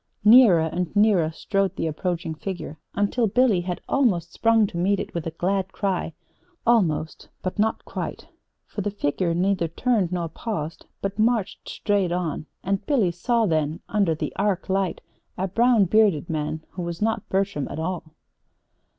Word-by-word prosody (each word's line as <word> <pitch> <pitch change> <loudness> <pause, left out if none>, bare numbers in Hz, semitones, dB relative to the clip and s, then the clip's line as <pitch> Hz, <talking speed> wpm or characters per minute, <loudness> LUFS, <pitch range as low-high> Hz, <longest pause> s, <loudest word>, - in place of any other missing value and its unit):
Nearer 215 -6 +8
and 170 +4 -3
nearer 205 -6 +4
strode 195 +3 -1
the - - -2
approaching 165 +1 -2
figure 160 -2 -6 0.2
until 205 +4 +1
Billy 220 -3 +3
had 175 0 -4
almost 190 - +1
sprung 225 -1 +4
to 185 - -6
meet 195 +2 +2
it - - -5
with 170 -1 -3
a 165 - -7
glad 190 +1 0
cry 195 -5 -1 0.5
almost, 175 -10 +1
but 185 +2 -3
not 220 +1 +1
quite; - - -5 0.4
for 205 - -5
the 205 - -1
figure 170 -2 -1
neither 185 -1 +1
turned 195 +1 0
nor 175 -2 -1
paused, 165 -3 -5
but 195 +1 -3
marched 220 -2 0
straight 200 -4 0
on 170 -3 -2 0.2
and 195 +1 -1
Billy 230 -12 +2
saw 230 +7 +1
then, 155 -3 0
under 195 -6 +2
the - - -4
arc 195 -2 0
light, 190 -1 0 0.4
a 190 +1 -1
brown 230 +1 +4
bearded 190 -6 +3
man 155 0 -3
who 180 - -6
was 170 -1 -4
not 225 0 -1
Bertram 190 -7 0
at - - -6
all. 170 +2 -3
190 Hz, 165 wpm, -24 LUFS, 170-210 Hz, 0.5 s, Nearer